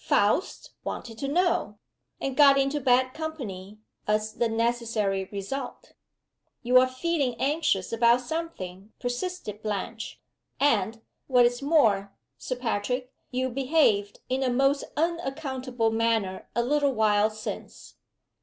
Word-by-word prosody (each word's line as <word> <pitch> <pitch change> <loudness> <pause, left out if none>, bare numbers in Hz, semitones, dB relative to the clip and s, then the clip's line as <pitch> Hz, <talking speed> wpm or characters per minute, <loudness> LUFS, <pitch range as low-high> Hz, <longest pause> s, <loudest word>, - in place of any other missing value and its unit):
Faust 210 - +1
'wanted 225 -2 -6
to 275 - -2
know' 335 - +1 0.4
and 270 -1 -3
got 280 -1 +7
into 275 +2 +1
bad 255 0 +3
company, 215 -12 -6 0.3
as 215 0 0
the 235 +1 0
necessary 225 -4 0
result." 245 +7 -6 0.7
"You 250 +1 +6
are 255 - +4
feeling 260 -1 -1
anxious 270 - 0
about 235 +2 +4
something," 220 - -6
persisted 245 - -4
Blanche. 215 +1 -4 0.4
"And, 225 -5 +2 0.3
what 250 -2 +5
is 245 +2 +1
more, 220 -10 +3 0.3
Sir 255 - -3
Patrick, 250 +2 -2 0.2
you 260 +1 -1
behaved 255 -6 +2
in 260 +1 -1
a 260 - +1
most 275 +3 +2
unaccountable 270 -7 -1
manner 225 -4 0
a 235 - +2
little 285 +2 +2
while 215 -2 +3
since." 215 0 -8
245 Hz, 125 wpm, -27 LUFS, 215-275 Hz, 0.7 s, got